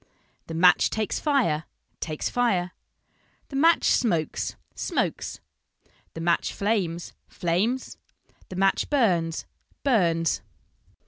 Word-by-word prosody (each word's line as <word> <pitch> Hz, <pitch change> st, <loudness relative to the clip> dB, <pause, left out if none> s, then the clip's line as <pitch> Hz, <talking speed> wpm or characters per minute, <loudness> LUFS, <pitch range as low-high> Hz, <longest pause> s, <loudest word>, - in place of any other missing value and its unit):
The 165 Hz, -, -5 dB
match 180 Hz, +2 st, +5 dB
takes 215 Hz, -1 st, -2 dB
fire, 240 Hz, -, +1 dB, 0.3 s
takes 155 Hz, -2 st, -3 dB
fire. 195 Hz, -8 st, +1 dB, 0.8 s
The 275 Hz, -, -7 dB
match 325 Hz, +4 st, +4 dB
smokes, 170 Hz, -, +1 dB, 0.2 s
smokes. -, -, -2 dB, 0.8 s
The 165 Hz, -, -5 dB
match 170 Hz, 0 st, +1 dB
flames, 190 Hz, -5 st, -1 dB
flames. 200 Hz, +10 st, -1 dB, 0.5 s
The 185 Hz, -, -7 dB
match 195 Hz, +1 st, +2 dB
burns, 175 Hz, -, +1 dB, 0.4 s
burns. 170 Hz, -, +2 dB
180 Hz, 100 wpm, -26 LUFS, 165-235 Hz, 0.8 s, match